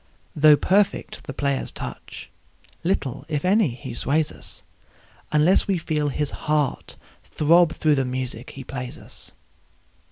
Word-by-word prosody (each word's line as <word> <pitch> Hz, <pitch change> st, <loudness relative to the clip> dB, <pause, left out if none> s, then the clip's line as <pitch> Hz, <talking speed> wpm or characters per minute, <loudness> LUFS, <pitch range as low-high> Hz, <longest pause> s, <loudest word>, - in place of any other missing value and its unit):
Though 150 Hz, 0 st, +7 dB
perfect 200 Hz, +5 st, +1 dB
the -, -, -5 dB
player's 140 Hz, -1 st, -1 dB
touch, -, -, -8 dB, 0.5 s
little, 145 Hz, -7 st, -1 dB
if 150 Hz, +1 st, -2 dB
any, 200 Hz, +1 st, +4 dB
he 130 Hz, -1 st, -7 dB
sways 145 Hz, +5 st, +1 dB
us, -, -, -5 dB, 0.7 s
Unless 155 Hz, +5 st, +4 dB
we 195 Hz, -2 st, +2 dB
feel 155 Hz, -3 st, -1 dB
his 145 Hz, +1 st, -1 dB, 0.2 s
heart 150 Hz, -3 st, 0 dB, 0.3 s
throb 170 Hz, +2 st, +4 dB
through 155 Hz, -2 st, +2 dB
the 135 Hz, -2 st, +2 dB
music 125 Hz, -2 st, -4 dB
he 135 Hz, -, -9 dB
plays 125 Hz, -1 st, -6 dB
us. -, -, -10 dB
150 Hz, 135 wpm, -24 LUFS, 135-165 Hz, 0.7 s, Though